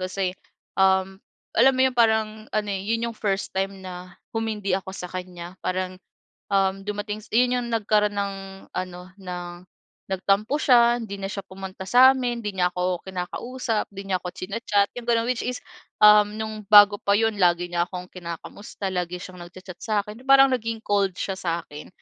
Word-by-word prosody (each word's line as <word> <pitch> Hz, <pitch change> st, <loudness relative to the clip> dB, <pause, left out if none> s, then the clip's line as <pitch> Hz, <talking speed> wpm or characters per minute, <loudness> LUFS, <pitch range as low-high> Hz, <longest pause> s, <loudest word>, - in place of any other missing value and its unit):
kasi, 185 Hz, 0 st, -2 dB, 0.5 s
um, 190 Hz, 0 st, +2 dB, 0.3 s
alam 265 Hz, +3 st, +5 dB
mo -, -, 0 dB
yun, 260 Hz, -, +2 dB
parang 220 Hz, -2 st, +1 dB
ano, 210 Hz, -1 st, -2 dB
eh, 195 Hz, +1 st, -4 dB
yun 230 Hz, +1 st, 0 dB
yung -, -, -19 dB
first 195 Hz, -2 st, -2 dB
time 195 Hz, 0 st, -3 dB
na 180 Hz, 0 st, -9 dB, 0.2 s
humindi 220 Hz, -3 st, -2 dB
ako 190 Hz, 0 st, -2 dB
sa 180 Hz, 0 st, -7 dB
kanya. 180 Hz, 0 st, -8 dB
Parang, 185 Hz, 0 st, -3 dB, 0.5 s
um, 195 Hz, 0 st, +1 dB
dumating 210 Hz, +1 st, -4 dB
s -, -, -19 dB
yun 250 Hz, +2 st, +3 dB
yung 245 Hz, -1 st, -2 dB
nagkaroon 210 Hz, -2 st, +2 dB
ng 200 Hz, -1 st, -2 dB, 0.4 s
ano, 180 Hz, -1 st, -4 dB
ng 180 Hz, -3 st, -6 dB, 0.6 s
nagtampo 195 Hz, +7 st, +1 dB
siya, 240 Hz, -4 st, +5 dB
hindi 215 Hz, -4 st, -6 dB
na 195 Hz, -, -3 dB
siya 195 Hz, -1 st, -5 dB
pumunta 190 Hz, 0 st, -8 dB
sa'min, 250 Hz, 0 st, +5 dB
di 210 Hz, -, -2 dB
niya 180 Hz, -2 st, 0 dB
ako 180 Hz, 0 st, 0 dB
kinakausap, 220 Hz, +5 st, -3 dB
di 195 Hz, 0 st, -8 dB
niya 185 Hz, -, +2 dB
ako 180 Hz, -, -7 dB
china-chat 200 Hz, +1 st, 0 dB
yung 240 Hz, -, -11 dB
ganun. 230 Hz, 0 st, +2 dB
Which 250 Hz, -2 st, -1 dB
is, 250 Hz, 0 st, -3 dB, 0.4 s
um, 210 Hz, 0 st, +7 dB
nung 215 Hz, -1 st, -5 dB
bago 205 Hz, 0 st, +8 dB
pa 200 Hz, -, +1 dB
yun 225 Hz, 0 st, +1 dB
lagi 175 Hz, -1 st, +3 dB
niya 175 Hz, 0 st, +1 dB
akong 180 Hz, 0 st, -7 dB
kinakamusta, 185 Hz, +3 st, -7 dB
lagi 180 Hz, -1 st, -2 dB
siyang 185 Hz, 0 st, -10 dB
nag-cha-chat 185 Hz, 0 st, -11 dB
sa'kin, 215 Hz, +2 st, -3 dB
parang 270 Hz, 0 st, +7 dB
naging 230 Hz, -3 st, -2 dB
cold 200 Hz, -2 st, +1 dB
siya 195 Hz, -1 st, -3 dB
sa'kin, 165 Hz, -3 st, -4 dB
200 Hz, 175 wpm, -24 LUFS, 185-220 Hz, 0.6 s, bago